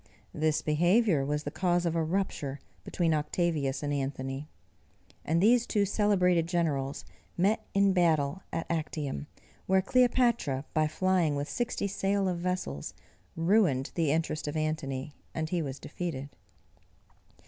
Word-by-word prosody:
This 155 0 +1
behaviour 175 +1 +3
was 150 +2 -1
the 145 - -4
cause 175 0 +1
of 170 -1 0
a 165 - +1
rupture 155 -5 -2 0.2
between 165 -3 0
Octavius 150 -2 0
and 145 0 -1
Antony; 135 0 -3 0.8
and 165 +2 +1
these 235 +2 +4
two 205 -2 +2
celebrated 185 -5 +2
generals 150 -6 -1 0.3
met 195 +5 +1
in 200 -1 +4
battle 160 -2 +2
at 165 - -2
Actium, 150 - -3 0.4
where 190 0 +3
Cleopatra, 235 - +2
by 155 -1 +2
flying 175 -2 +1
with 145 +1 -2
sixty 240 -4 -2
sail 195 0 0
of 180 -2 -1
vessels, 175 - -3 0.4
ruined 165 -6 +2
the 165 -4 +1
interest 155 -1 -1
of 145 +2 -2
Antony, 150 -3 -2 0.2
and 160 -1 -2
he 175 -1 0
was 135 -3 -4
defeated. 145 -4 -5
165 Hz, 135 wpm, -29 LUFS, 145-185 Hz, 0.8 s, these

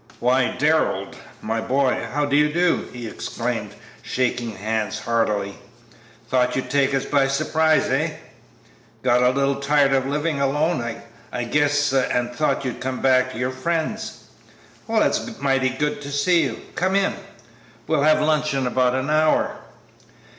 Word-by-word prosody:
"Why, 125 +1 +2
Darrell, 145 -10 +1 0.3
my 110 +1 -1
boy, 130 +2 0
how 145 +2 0
do 145 0 0
you 150 +1 +4
do?" 175 +2 +1
he 120 -1 -7
exclaimed, - - -4 0.3
shaking 125 -2 -2
hands 110 0 -2
heartily; 105 -4 -1 0.7
"thought 125 -1 +1
you'd 125 -1 -3
take 140 -1 +2
us 135 0 -1
by 140 -2 +2
surprise, 155 +3 +2
eh? - - 0 0.9
Got 125 0 +3
a 125 - +5
little 140 +1 +1
tired 140 0 +2
of 135 0 +1
living 150 +1 -1
alone, 150 +2 +1 0.5
I 125 - -3
guess, 145 +2 +1
and 125 -2 0
thought 140 +1 0
you'd 125 - -4
come 130 0 -3
back 130 -1 +3
to 110 - -8
your 125 +2 -1
friends. 170 +10 -3 0.6
Well, 225 -1 +2
it's 220 - -1
mighty 135 -2 +2
good 145 +3 -2
to 140 0 -7
see 165 +5 +3
you; - - -4
come 185 +2 0
in; 200 0 +2 0.7
we'll 155 -3 +1
have 155 +1 +4
lunch 155 -1 +1
in 135 -1 0
about 125 0 +1
an 130 +3 -1
hour." 155 0 +2
135 Hz, 155 wpm, -22 LUFS, 125-150 Hz, 0.9 s, a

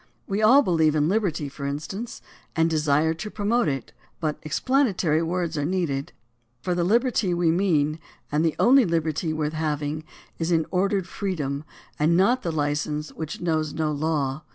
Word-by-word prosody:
We 200 +2 -1
all 255 +7 +7
believe 160 - +2
in 150 0 +2
liberty, 180 -6 0
for 140 0 -6
instance, 190 +11 -5 0.3
and 165 0 +2
desire 155 0 +2
to 195 +6 -6
promote 215 +1 +1
it, 135 -3 -3 0.3
but 155 -3 -2
explanatory 185 - +1
words 170 -2 -1
are - - 0
needed, 150 -5 -1 0.5
for 180 - 0
the 175 0 0
liberty 215 -2 +2
we 170 -2 +2
mean, 160 -4 +1 0.3
and 150 +2 +2
the 165 -2 +1
only 265 +2 +6
liberty 165 -3 0
worth 155 -1 -2
having, 155 -1 -2 0.4
is 165 +1 -1
an 160 -2 +2
ordered 195 0 +1
freedom 150 -9 -3 0.4
and 160 +3 +3
not 240 +7 +3
the 170 - -2
license 150 0 -2
which 160 -2 -6
knows 155 -3 -1
no 155 -1 0
law. 150 -2 -1
160 Hz, 165 wpm, -25 LUFS, 150-185 Hz, 0.5 s, all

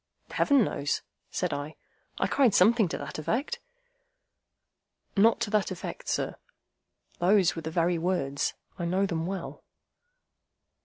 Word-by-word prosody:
"Heaven 280 -4 +4
knows," 145 -7 -1 0.3
said 180 -4 -1
I. 145 +2 -5 0.4
"I - - +1
cried 250 -8 +3
something 215 +2 +5
to - - -4
that - - -6
effect—" 265 - -1 1.6
"Not 220 +3 +5
to 205 - -1
that 210 -2 +2
effect, 185 -3 -6
sir. - - -1 0.8
Those 185 0 +4
were 165 - -4
the 160 - -4
very 170 +1 +1
words. 160 -6 -1 0.2
I 170 - -1
know 185 +3 +1
them 165 -3 -2
well." 190 -2 -5
185 Hz, 135 wpm, -28 LUFS, 165-210 Hz, 1.6 s, something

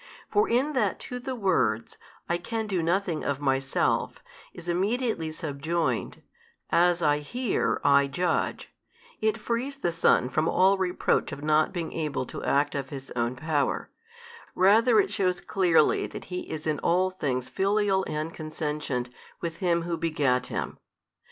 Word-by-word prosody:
For 415 - +3
in 265 +6 +2
that 215 -8 0
to 250 - -5
the 260 +1 -4
words, 170 - 0 0.3
I 170 0 0
can 225 +5 -3
do 190 -4 -1
nothing 170 -1 0
of 140 -1 -1
Myself, 135 -1 0 0.3
is 175 0 -12
immediately 195 -1 0
subjoined, 155 +1 -2 0.5
As 175 0 +3
I 150 -1 +3
hear, 240 - -1
I 140 0 +5
judge, 175 +6 -1 0.5
it 220 +1 +1
frees 235 +5 -2
the 175 -10 -1
Son 165 -6 +3
from 155 +5 0
all 190 +1 +4
reproach 180 -1 0
of 145 - -7
not 155 0 +3
being 170 -3 -4
able 150 -5 -2
to - - -7
act 145 +1 +2
of 135 -2 -3
His 135 -1 -8
Own 120 +1 0
Power: 145 +1 -1 0.6
rather 220 +4 +5
it 195 -1 +2
shews 185 -3 0
clearly 175 -5 +2
that - - -9
He 180 - -4
is 155 0 -5
in 155 -2 0
all 185 +2 +2
things 130 -8 -2
Filial 195 -1 +2
and 155 +2 -3
Consentient 150 -5 -3 0.3
with 165 -1 -4
Him 170 -2 +1
Who 170 0 -2
begat 145 -6 +1
Him. - - -4
170 Hz, 155 wpm, -27 LUFS, 145-195 Hz, 0.6 s, I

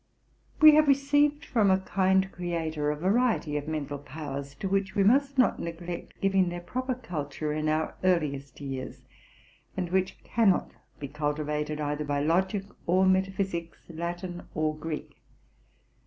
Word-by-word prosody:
We 310 -1 +10
have 305 0 +5
received 290 +2 +3
from 215 -5 +2
a 190 - +5
kind 190 0 +1
Creator 160 -4 -2
a 150 - 0
variety 190 -2 +1
of 150 0 -3
mental 145 -2 -3
powers, 140 0 -7
to 195 - -4
which 195 0 0
we 200 - +3
must 275 +6 +3
not 255 - +3
neglect 170 +1 -6
giving 195 -2 +2
their 175 0 -5
proper 255 +9 -3
culture 155 - -4
in 155 0 -1
our 155 +1 0
earliest 145 -7 0
years, 135 -2 -6 0.7
and 180 -2 -2
which 190 0 -1
cannot 220 -6 +2 0.3
be 140 - -6
cultivated, 150 +1 -2
either 150 0 -2
by 145 -1 -1
logic 190 +6 +1 0.2
or 185 +2 +4
metaphysics, 190 -2 0
Latin 175 +2 -5
or 155 0 0
Greek. 155 0 -6
175 Hz, 145 wpm, -28 LUFS, 150-195 Hz, 0.7 s, We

